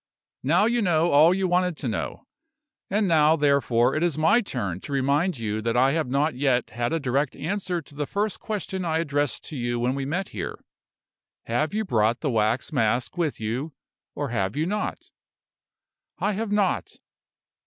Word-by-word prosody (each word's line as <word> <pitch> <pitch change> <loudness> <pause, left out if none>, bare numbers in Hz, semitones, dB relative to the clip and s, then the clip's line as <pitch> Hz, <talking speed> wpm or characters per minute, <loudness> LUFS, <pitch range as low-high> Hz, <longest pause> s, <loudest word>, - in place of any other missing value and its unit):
Now 170 +9 +3
you 235 +1 +2
know 170 -3 +2
all 150 +4 +7
you 190 0 +1
wanted 180 -2 +1
to 135 - -4
know; 115 - -4 0.6
and 205 +1 +1
now, 155 -2 +5
therefore, 140 -4 +2
it 155 - 0
is 170 -4 +1
my 160 +10 +4
turn 100 - -4
to 145 - -9
remind 140 +5 +1
you 110 -1 -2
that 115 +2 0
I 130 +2 +4
have 160 -2 0
not 145 +4 +1
yet 125 -2 +1
had 120 +1 -2
a 165 - 0
direct 135 0 0
answer 180 0 -2
to 145 - -17
the 145 0 -3
first 205 +1 -1
question 195 -3 -4
I 160 -2 0
addressed 145 -4 -1
to 155 - -7
you 120 -2 -2
when 125 +2 +1
we 135 0 -3
met 180 +7 -2
here. 90 -6 -6 0.8
Have 150 - -1
you 220 0 0
brought 115 - +1
the 145 - 0
wax 115 +6 0
mask 120 +1 +1
with 170 -5 -1
you, 125 +8 -3 0.4
or 145 -2 -3
have 100 -5 -1
you 155 +2 0
not?" 210 +4 -3 1.1
"I 210 - 0
have 210 +1 -3
not." 205 -3 0
145 Hz, 185 wpm, -25 LUFS, 125-180 Hz, 1.1 s, all